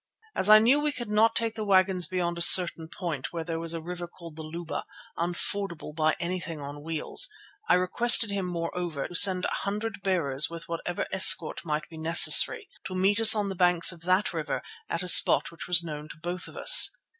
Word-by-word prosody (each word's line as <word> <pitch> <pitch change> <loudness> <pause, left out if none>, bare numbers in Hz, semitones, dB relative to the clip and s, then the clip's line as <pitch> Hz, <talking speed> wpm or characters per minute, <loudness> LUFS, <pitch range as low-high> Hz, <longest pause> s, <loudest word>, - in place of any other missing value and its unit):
As 190 - +1
I 215 - +7
knew 240 +7 +1
we 300 0 -2
could 240 -6 -9
not 220 +2 0
take 230 -1 -1
the 220 -1 -8
wagons 185 -3 -1
beyond 175 -1 -5
a - - -7
certain 170 -2 +5
point 160 - -8
where 170 -1 -7
there 165 0 -7
was 165 0 -4
a 165 - -8
river 175 0 -9
called 170 -2 -16
the 160 - -11
Luba, 165 +2 -9 0.3
unfordable 175 -1 -6
by 155 0 -2
anything 175 -2 -7
on 145 +1 -11
wheels, 160 0 0 0.4
I - - +3
requested 220 +5 +3
him, 195 -2 -5
moreover, 170 -3 -7
to - - -15
send 185 +1 +4
a - - -3
hundred 210 +1 -7
bearers 150 -8 -1
with 165 0 -12
whatever 170 +1 -7
escort 190 - +4
might 155 -1 -6
be 165 - -15
necessary, 165 - +4 0.2
to 190 -1 -8
meet 195 +3 -1
us 225 -1 +7
on 205 -2 -4
the - - -6
banks 175 -1 +2
of 170 -2 -14
that 185 +4 -2
river 160 -2 -6 0.3
at 170 +2 -5
a - - -8
spot 180 - +4
which 170 - -12
was 175 -1 +2
known 150 -2 -10
to - - -14
both 175 +3 -7
of - - -15
us. - - +6
175 Hz, 210 wpm, -24 LUFS, 165-195 Hz, 0.4 s, I